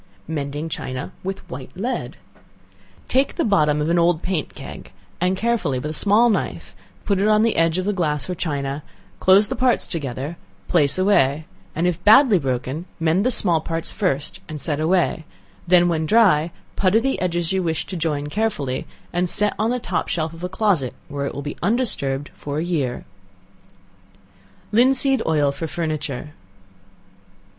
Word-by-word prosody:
Mending 145 Hz, 0 st, -3 dB
China 130 Hz, -4 st, -5 dB
with 190 Hz, +1 st, -5 dB
White 130 Hz, 0 st, -8 dB
Lead. 240 Hz, +7 st, -3 dB, 0.9 s
Take 270 Hz, +2 st, +1 dB
the -, -, 0 dB
bottom 150 Hz, -8 st, +3 dB
of 150 Hz, -, 0 dB
an 170 Hz, +1 st, +2 dB
old 170 Hz, -1 st, +2 dB
paint 180 Hz, -5 st, -2 dB
keg, -, -, -10 dB, 0.3 s
and 180 Hz, +2 st, +1 dB
carefully 210 Hz, -, 0 dB
with 150 Hz, +4 st, -4 dB
a -, -, -5 dB
small 215 Hz, +7 st, +5 dB
knife, 165 Hz, -, -3 dB, 0.3 s
put 200 Hz, -2 st, +1 dB
it 200 Hz, -, +2 dB
on 215 Hz, 0 st, +4 dB
the 230 Hz, -, +2 dB
edge 165 Hz, +1 st, +2 dB
of 195 Hz, +2 st, -1 dB
glass 150 Hz, -5 st, -1 dB
or 180 Hz, -, -2 dB
china, 145 Hz, -4 st, -3 dB, 0.4 s
close 195 Hz, +3 st, +5 dB
the -, -, -3 dB
parts 250 Hz, 0 st, +2 dB
together, 135 Hz, -5 st, -4 dB
and 165 Hz, +4 st, -6 dB, 0.3 s
place 150 Hz, -4 st, +3 dB
away; 165 Hz, -7 st, +2 dB, 0.3 s
if 170 Hz, 0 st, -1 dB
badly 220 Hz, -2 st, +6 dB
broken, 135 Hz, +3 st, -3 dB
mend 165 Hz, +4 st, +2 dB
the 250 Hz, -, +2 dB
small 175 Hz, -9 st, +2 dB
parts 165 Hz, +1 st, -1 dB
first, 145 Hz, -9 st, -1 dB
and 155 Hz, -1 st, -5 dB
set 145 Hz, 0 st, -1 dB
away; 170 Hz, 0 st, +1 dB, 0.4 s
then 175 Hz, 0 st, +5 dB
when 160 Hz, -2 st, 0 dB
dry, 180 Hz, -7 st, +4 dB, 0.3 s
putty 195 Hz, +3 st, +3 dB
the 270 Hz, +3 st, -1 dB
edges 175 Hz, -1 st, 0 dB
you 190 Hz, 0 st, +1 dB
wish 165 Hz, -3 st, -2 dB
to 185 Hz, -, -7 dB
join 155 Hz, -4 st, -1 dB
carefully, 150 Hz, -7 st, -2 dB, 0.3 s
and 175 Hz, 0 st, 0 dB
set 210 Hz, +2 st, +2 dB
on 220 Hz, +2 st, +1 dB
the 250 Hz, -, 0 dB
top 185 Hz, -7 st, -2 dB
shelf 160 Hz, -1 st, -2 dB
of 165 Hz, +1 st, -11 dB
a 180 Hz, -, -2 dB
closet, 185 Hz, -, 0 dB
where 140 Hz, -1 st, -3 dB
it -, -, -6 dB
will 140 Hz, -, -5 dB
be 145 Hz, -, -6 dB
undisturbed 170 Hz, -, -1 dB
for 145 Hz, 0 st, -5 dB
a 155 Hz, -, 0 dB
year. 150 Hz, -8 st, -2 dB, 1.7 s
Linseed 260 Hz, +3 st, +4 dB
Oil 150 Hz, -3 st, +2 dB
for 160 Hz, +4 st, -5 dB
Furniture. 155 Hz, -3 st, -4 dB
170 Hz, 170 wpm, -22 LUFS, 150-200 Hz, 1.7 s, badly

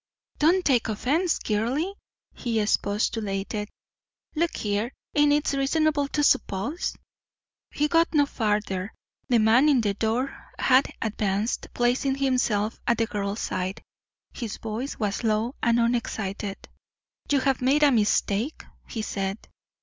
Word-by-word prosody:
"Don't 350 Hz, +5 st, +3 dB
take 245 Hz, -5 st, +2 dB
offence, 300 Hz, -, +1 dB
girly," 245 Hz, -, -1 dB, 0.4 s
he 230 Hz, -2 st, -2 dB
expostulated. 210 Hz, 0 st, -1 dB, 0.6 s
"Look 335 Hz, +2 st, 0 dB
here 210 Hz, +3 st, -1 dB, 0.2 s
ain't 295 Hz, 0 st, +4 dB
it 295 Hz, 0 st, +2 dB
reasonable 290 Hz, +1 st, +1 dB
to 295 Hz, +1 st, -1 dB
s'pose 285 Hz, -, +1 dB, 0.4 s
" -, -, -68 dB
He 300 Hz, -, +4 dB
got 330 Hz, +2 st, +3 dB
no 295 Hz, -3 st, +4 dB
farther. 210 Hz, -5 st, -2 dB, 0.3 s
The 245 Hz, -, +4 dB
man 230 Hz, +7 st, +5 dB
in 270 Hz, -5 st, +4 dB
the 205 Hz, -2 st, 0 dB
door 225 Hz, +6 st, -1 dB, 0.2 s
had 260 Hz, +1 st, +4 dB
advanced, 210 Hz, 0 st, -1 dB
placing 250 Hz, +3 st, +1 dB
himself 250 Hz, -6 st, 0 dB
at 235 Hz, -, +3 dB
the 230 Hz, -, +2 dB
girl's 205 Hz, 0 st, -3 dB
side. 185 Hz, +1 st, -3 dB, 0.5 s
His 230 Hz, -5 st, -5 dB
voice 230 Hz, +5 st, -4 dB
was 210 Hz, 0 st, -2 dB
low 220 Hz, +2 st, +1 dB
and 235 Hz, 0 st, +3 dB
unexcited. 215 Hz, -4 st, -1 dB, 0.7 s
"You 280 Hz, -2 st, +3 dB
have 270 Hz, -1 st, +1 dB
made 275 Hz, +4 st, +3 dB
a 290 Hz, -, +6 dB
mistake?" 215 Hz, +3 st, +1 dB, 0.3 s
he 220 Hz, -, -4 dB
said. 195 Hz, -1 st, -2 dB
235 Hz, 135 wpm, -26 LUFS, 210-280 Hz, 0.7 s, a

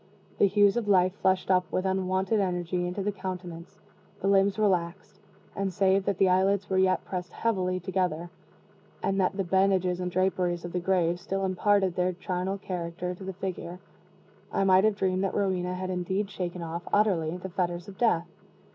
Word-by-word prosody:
The 200 Hz, -, +6 dB
hues 205 Hz, +2 st, +4 dB
of 230 Hz, -3 st, -1 dB
life 185 Hz, -2 st, +4 dB
flushed 190 Hz, 0 st, +2 dB
up 180 Hz, -1 st, +2 dB
with 185 Hz, -, -1 dB
unwonted 190 Hz, +2 st, 0 dB
energy 180 Hz, -2 st, -1 dB
into 180 Hz, +3 st, -3 dB
the 205 Hz, -, 0 dB
countenance 180 Hz, -3 st, -7 dB, 0.4 s
the 195 Hz, -, -2 dB
limbs 195 Hz, 0 st, +3 dB
relaxed 185 Hz, -4 st, -1 dB, 0.4 s
and, 195 Hz, -1 st, -1 dB
save 195 Hz, 0 st, +2 dB
that 200 Hz, -3 st, 0 dB
the 195 Hz, -, +4 dB
eyelids 190 Hz, +1 st, +2 dB
were 190 Hz, -1 st, +1 dB
yet 185 Hz, 0 st, +2 dB
pressed 180 Hz, -2 st, -5 dB
heavily 185 Hz, -5 st, 0 dB
together, 180 Hz, -2 st, -2 dB, 0.7 s
and 195 Hz, 0 st, +1 dB
that 185 Hz, +1 st, 0 dB
the 195 Hz, -, +1 dB
bandages 185 Hz, -1 st, +2 dB
and 180 Hz, 0 st, -2 dB
draperies 180 Hz, -1 st, 0 dB
of 175 Hz, -, -7 dB
the 180 Hz, -, 0 dB
grave 175 Hz, -1 st, +1 dB
still 195 Hz, +1 st, -2 dB
imparted 190 Hz, 0 st, +2 dB
their 180 Hz, 0 st, +1 dB
charnel 185 Hz, +2 st, -3 dB
character 180 Hz, -2 st, -4 dB
to 180 Hz, -, -11 dB
the 190 Hz, 0 st, -5 dB
figure, 180 Hz, -2 st, -5 dB, 0.7 s
I -, -, +1 dB
might 190 Hz, +1 st, +5 dB
have 215 Hz, -1 st, +3 dB
dreamed 190 Hz, -1 st, 0 dB
that 195 Hz, -, -1 dB
Rowena 180 Hz, -2 st, 0 dB
had 185 Hz, 0 st, -4 dB
indeed 190 Hz, +3 st, -2 dB
shaken 180 Hz, -2 st, -4 dB
off, 165 Hz, +1 st, -4 dB
utterly, 180 Hz, -6 st, +2 dB
the 190 Hz, +1 st, -7 dB
fetters 175 Hz, 0 st, -2 dB
of 195 Hz, -2 st, -11 dB
Death. 175 Hz, -8 st, +2 dB
185 Hz, 180 wpm, -28 LUFS, 180-195 Hz, 0.7 s, The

